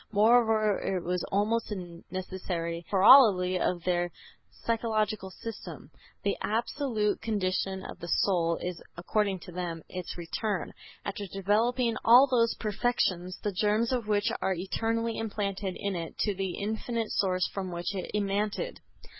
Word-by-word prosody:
Moreover 220 -1 +4
it 185 -3 -2
was 180 0 -1
almost 215 +4 +1
a 175 -4 -6
necessary 180 -2 -4
corollary 195 -3 +7
of 175 -2 0
their 175 -1 +1 0.4
psychological 215 -3 -1
system. 185 -8 -8 0.3
The 200 - 0
absolute 225 -1 0
condition 190 -2 -1
of - - -8
the 170 - -7
soul 170 -2 +2
is, 180 -2 -4 0.2
according 195 +1 0
to 180 - -10
them, 170 -2 -4
its 180 -1 -6
return, 185 +4 -3 0.3
after 200 0 -4
developing 225 +5 +1
all 245 +4 +8
those 235 -4 +2
perfections, 195 -5 -1
the 205 - 0
germs 210 +5 +1
of 245 -4 -1
which 205 -1 +2
are 190 - +1
eternally 225 +5 -1
implanted 200 -3 -3
in 200 -1 -2
it, 165 -2 -5
to 205 - +1
the 190 -1 -3
Infinite 220 +2 -2
Source 185 -2 +1
from 190 -2 -4
which 175 +3 -3
it 190 -2 -4
emanated. 210 - -1
200 Hz, 140 wpm, -29 LUFS, 180-220 Hz, 0.4 s, all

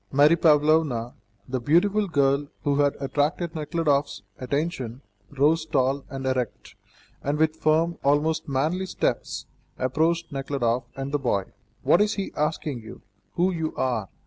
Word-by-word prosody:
Mary 145 +4 +6
Pavlovna, 150 -6 +3 0.3
the 130 0 -2
beautiful 195 - +2
girl 140 -3 +2 0.2
who 140 -1 +1
had 145 -1 +3
attracted 150 +4 -1
Nekhludoff's 150 - 0 0.2
attention, 135 -2 -3 0.3
rose 150 +4 +2
tall 135 -2 0
and 135 -1 -6
erect, 130 -3 -2 0.5
and 145 +2 -1
with 155 0 +2
firm, 160 +2 +1
almost 150 +3 +1
manly 155 +8 0
steps, - - -2 0.3
approached 165 +6 0
Nekhludoff 135 -3 -1
and 135 0 -4
the 145 - 0
boy. 110 -7 0 0.4
"What 175 - +5
is 210 0 +2
he 195 - -4
asking 150 -3 -1
you? 110 - -12 0.3
Who 180 +2 +2
you 160 -3 -3
are?" 120 -7 -1
145 Hz, 140 wpm, -25 LUFS, 135-160 Hz, 0.5 s, Mary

